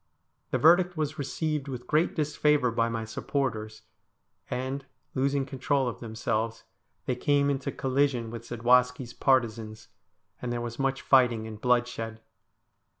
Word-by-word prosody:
The - - +1
verdict 175 +2 +5
was 155 0 -2
received 150 +1 -2
with 125 -2 -6
great 155 +6 +1
disfavour 150 -4 +2
by 115 0 +1
my 115 -1 -3
supporters, 110 -3 -3 0.7
and, 130 +2 -3 0.3
losing 135 +1 +1
control 135 0 0
of 120 - -4
themselves, 110 0 -2 0.4
they 125 - 0
came 140 +2 +2
into 135 -1 -2
collision 130 -3 0
with 115 -1 -6
Zadwaski's 125 +1 +2
partisans, 115 -5 0 0.5
and 125 - -3
there 120 - -1
was 120 +1 -5
much 135 0 0
fighting 120 -4 +4
and 110 -1 -8
bloodshed. 120 -2 0
125 Hz, 135 wpm, -28 LUFS, 115-140 Hz, 0.7 s, verdict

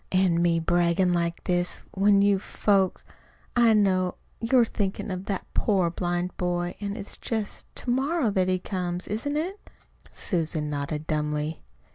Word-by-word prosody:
"An' 185 -2 +3
me 170 -1 +3
braggin' 175 +2 +2
like 170 -1 -1
this, 175 0 -1
when 200 +1 +4
you 200 -1 +4
folks! 195 -1 +1 0.5
I 235 -2 +6
know 185 -3 +2 0.2
you're 235 +1 +4
thinkin' 200 -2 -3
of 185 +1 -4
that 195 -2 -3
poor 190 -6 +2
blind 175 +1 -2
boy. 175 0 -1
An' 200 0 -3
it's 205 -2 -6
just 220 -3 -4
to 245 - -2
morrow 270 -1 +1
that 190 -2 +2
he 185 0 +2
comes, 180 -1 -3
isn't 285 +8 -2
it?" 370 +6 -2 0.5
Susan 160 -4 -2
nodded 150 +1 -3
dumbly. 150 0 -2
185 Hz, 150 wpm, -26 LUFS, 175-205 Hz, 0.5 s, I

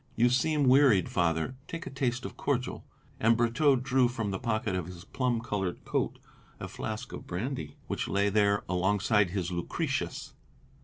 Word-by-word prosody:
"You 120 +2 +4
seem 140 +3 +2
wearied, 125 - +5
Father. 80 +3 0
Take 165 0 -6
a - - -6
taste 130 -2 -1
of - - -6
cordial," 130 -3 -2 0.4
and 115 +1 +4
Brotteaux 120 +5 +3
drew 130 0 +2
from 115 -4 -3
the 95 - -3
pocket 110 -2 -1
of 90 -2 -3
his 90 0 -10
plum 125 -2 -1
coloured 95 -6 -3
coat - - -1 0.4
a - - -5
flask 110 +3 -5
of - - -8
brandy, 90 - -4
which - - -3
lay 100 +1 +2
there 100 0 +2
alongside 100 +2 +2
his 90 -1 -2
Lucretius. 85 -1 -3
110 Hz, 165 wpm, -29 LUFS, 95-125 Hz, 0.4 s, wearied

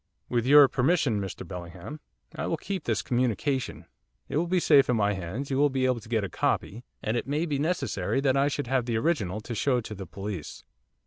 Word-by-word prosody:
'With 120 0 0
your 145 0 +9
permission, 130 - +1
Mr 95 -2 -6
Bellingham, 90 - -8 0.4
I - - -3
will 165 - -1
keep 190 +1 -5
this 110 -3 0
communication, 125 +2 -1 0.4
it - - -1
will 170 +3 +1
be 180 +1 +2
safe 140 -6 +5
in 125 - +3
my 105 -2 +2
hands, 95 +10 -5
you 135 - +1
will 145 0 +5
be 130 -1 0
able 130 -2 +1
to 110 0 -14
get 110 -3 +1
a - - -1
copy, 110 +5 -1 0.2
and 110 - -1
it 120 - -2
may 150 +4 0
be 145 -4 -2
necessary 160 -3 -1
that 135 -1 +2
I 140 +1 +3
should 145 0 -2
have 125 -1 0
the 115 -2 0
original 110 - 0
to 120 - -6
show 125 +3 +1
to 110 - -7
the 95 -3 -8
police. 95 -3 -6
125 Hz, 220 wpm, -27 LUFS, 105-145 Hz, 0.4 s, your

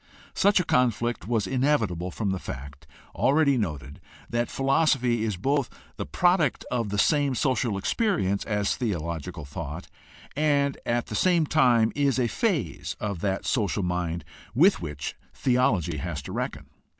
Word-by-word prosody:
Such 200 -1 +4
a - - +1
conflict 120 -4 +1
was 115 -4 +1
inevi 135 +1 +2
table 90 +1 -4
from 100 +1 -2
the 95 - -2
fact, 70 0 -8 0.3
already 140 +4 +3
noted, 75 - -4 0.3
that 120 +1 0
philosophy 135 -4 +2
is 105 -4 -1
both 140 +6 0 0.3
the - - -4
product 175 -6 +2
of 115 -4 -1
the 105 - -2
same 145 +4 +2
social 125 -6 0
experience 100 - 0
as 105 -2 0
theological 85 - -3
thought, 70 - -7 0.5
and 140 -2 +2
at 120 0 +1
the - - -8
same 175 - +3
time 120 -7 +4
is 140 -3 +2
a 125 - +2
phase 115 - -1
of 100 -4 -3
that 95 -1 -1
social 105 -4 0
mind 90 -1 -2 0.3
with 180 - +5
which 75 -3 -5 0.2
theology 105 - +1
has 75 0 -4
to - - -8
reckon. - - -4
115 Hz, 150 wpm, -26 LUFS, 90-140 Hz, 0.5 s, with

